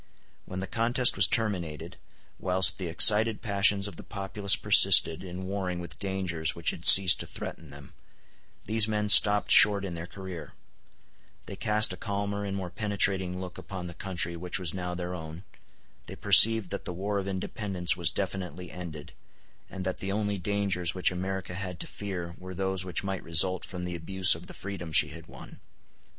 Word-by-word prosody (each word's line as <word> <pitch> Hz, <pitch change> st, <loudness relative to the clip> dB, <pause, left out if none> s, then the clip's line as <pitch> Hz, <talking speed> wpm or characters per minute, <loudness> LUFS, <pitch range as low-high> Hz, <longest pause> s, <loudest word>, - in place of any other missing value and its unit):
When 95 Hz, -, -9 dB
the 95 Hz, -, -4 dB
contest 120 Hz, +4 st, 0 dB
was 100 Hz, -1 st, +5 dB
terminated, 95 Hz, -10 st, -4 dB, 0.4 s
whilst 95 Hz, +1 st, +2 dB
the 90 Hz, -, -5 dB
excited 105 Hz, +6 st, +3 dB
passions 100 Hz, -1 st, +2 dB
of 95 Hz, -5 st, -12 dB
the -, -, -11 dB
populace 100 Hz, 0 st, -2 dB
persisted 80 Hz, +3 st, +5 dB
in 90 Hz, 0 st, -9 dB
warring 95 Hz, -2 st, -5 dB
with 85 Hz, -1 st, -9 dB
dangers 95 Hz, -5 st, -3 dB
which 85 Hz, -, -2 dB
had 85 Hz, -, -2 dB
ceased 95 Hz, -2 st, +10 dB
to -, -, -6 dB
threaten 80 Hz, -, -9 dB
them, 70 Hz, -1 st, -13 dB, 0.7 s
these 110 Hz, 0 st, +2 dB
men 105 Hz, -1 st, -3 dB
stopped 105 Hz, -1 st, +6 dB
short 100 Hz, -1 st, +5 dB
in 90 Hz, -, -7 dB
their 85 Hz, 0 st, -8 dB
career; 95 Hz, -3 st, -10 dB, 0.9 s
they -, -, -9 dB
cast 105 Hz, +1 st, +2 dB
a -, -, -10 dB
calmer 100 Hz, +1 st, -5 dB
and 100 Hz, -1 st, -5 dB
more 90 Hz, -2 st, -7 dB
penetrating 95 Hz, -3 st, -1 dB
look 90 Hz, -1 st, -9 dB
upon 95 Hz, -2 st, -9 dB
the 85 Hz, -, -9 dB
country 85 Hz, -2 st, -3 dB
which 90 Hz, +1 st, -2 dB
was 90 Hz, -4 st, -5 dB
now 90 Hz, -1 st, -6 dB
their 90 Hz, 0 st, -6 dB
own; 80 Hz, +1 st, -10 dB, 0.6 s
they -, -, -9 dB
perceived 105 Hz, 0 st, +5 dB
that 100 Hz, -, -6 dB
the 90 Hz, -, -6 dB
war 100 Hz, +3 st, -4 dB
of 95 Hz, -, -7 dB
independence 95 Hz, -2 st, -3 dB
was 85 Hz, -2 st, +1 dB
definitely 90 Hz, -2 st, -6 dB
ended, 80 Hz, -3 st, -10 dB, 0.6 s
and 95 Hz, -1 st, -8 dB
that 95 Hz, 0 st, -5 dB
the 95 Hz, -, -6 dB
only 105 Hz, -1 st, -3 dB
dangers 95 Hz, -2 st, -3 dB
which 90 Hz, -, +2 dB
America 95 Hz, 0 st, -6 dB
had 90 Hz, -1 st, -8 dB
to -, -, -5 dB
fear 90 Hz, -4 st, -8 dB
were 95 Hz, 0 st, -10 dB
those 95 Hz, 0 st, -2 dB
which 90 Hz, +1 st, -3 dB
might 95 Hz, -1 st, -5 dB
result 85 Hz, +3 st, 0 dB
from 90 Hz, -1 st, -7 dB
the 90 Hz, -1 st, -6 dB
abuse 95 Hz, +3 st, +3 dB
of 80 Hz, +2 st, -11 dB
the -, -, -13 dB
freedom 95 Hz, -4 st, -9 dB
she 80 Hz, +1 st, +4 dB
had 80 Hz, +1 st, -12 dB
won. -, -, -14 dB
95 Hz, 185 wpm, -26 LUFS, 90-100 Hz, 0.9 s, ceased